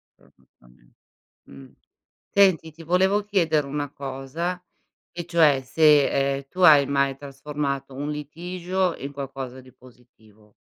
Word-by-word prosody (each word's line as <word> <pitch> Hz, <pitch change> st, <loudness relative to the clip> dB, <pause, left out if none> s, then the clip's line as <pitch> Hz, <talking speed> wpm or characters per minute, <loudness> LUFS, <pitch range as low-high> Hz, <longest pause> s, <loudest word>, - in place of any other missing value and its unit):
però -, -, -26 dB
giustame -, -, -26 dB, 0.6 s
mh. 70 Hz, -1 st, -14 dB, 0.6 s
Senti 185 Hz, -5 st, +4 dB
ti 165 Hz, +2 st, -14 dB
volevo 190 Hz, +5 st, +2 dB
chiedere 165 Hz, -8 st, +1 dB
una 145 Hz, 0 st, -4 dB
cosa 140 Hz, +7 st, -5 dB, 0.5 s
e 175 Hz, -1 st, -5 dB
cioè 160 Hz, -5 st, +3 dB
se, 140 Hz, 0 st, +3 dB
ehm, 135 Hz, 0 st, -10 dB
tu 185 Hz, -, -6 dB
hai 150 Hz, -5 st, +7 dB
mai 140 Hz, -1 st, +1 dB
trasformato 140 Hz, -1 st, -5 dB
un 145 Hz, +3 st, -5 dB
litigio 175 Hz, +4 st, -3 dB
in 140 Hz, +1 st, -7 dB
qualcosa 135 Hz, -2 st, -7 dB
di 130 Hz, 0 st, -18 dB
positivo. 110 Hz, -4 st, -22 dB
145 Hz, 130 wpm, -24 LUFS, 135-170 Hz, 0.6 s, hai